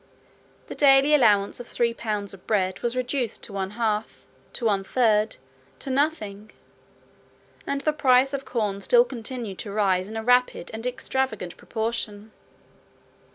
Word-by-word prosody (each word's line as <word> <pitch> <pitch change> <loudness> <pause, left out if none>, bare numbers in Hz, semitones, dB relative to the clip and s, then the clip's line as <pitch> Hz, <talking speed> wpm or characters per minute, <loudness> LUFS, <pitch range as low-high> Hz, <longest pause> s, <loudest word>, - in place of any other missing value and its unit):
The - - -7
daily 275 +1 +5
allowance 210 -8 +4
of 245 - -8
three 235 -1 0
pounds 210 -4 -4
of 190 - -15
bread 190 -4 0
was 240 +1 -2
reduced 250 -2 -2
to - - -6
one 190 -1 -2
half, 220 -2 -2 0.3
to 240 - -3
one 200 -3 +2
third, 215 -1 +2 0.4
to 270 - -4
nothing; 215 -8 -1 1.2
and 280 0 -1
the 305 - +1
price 265 -1 +4
of 275 -1 -3
corn 210 -6 -2
still 485 - +5
continued 235 - -6
to 205 - -5
rise 195 -2 +1
in 220 - -6
a 220 - -3
rapid 245 -6 +2
and 225 +2 -4
extravagant 250 -7 -2
proportion. 220 -2 -4
225 Hz, 150 wpm, -25 LUFS, 205-260 Hz, 1.2 s, daily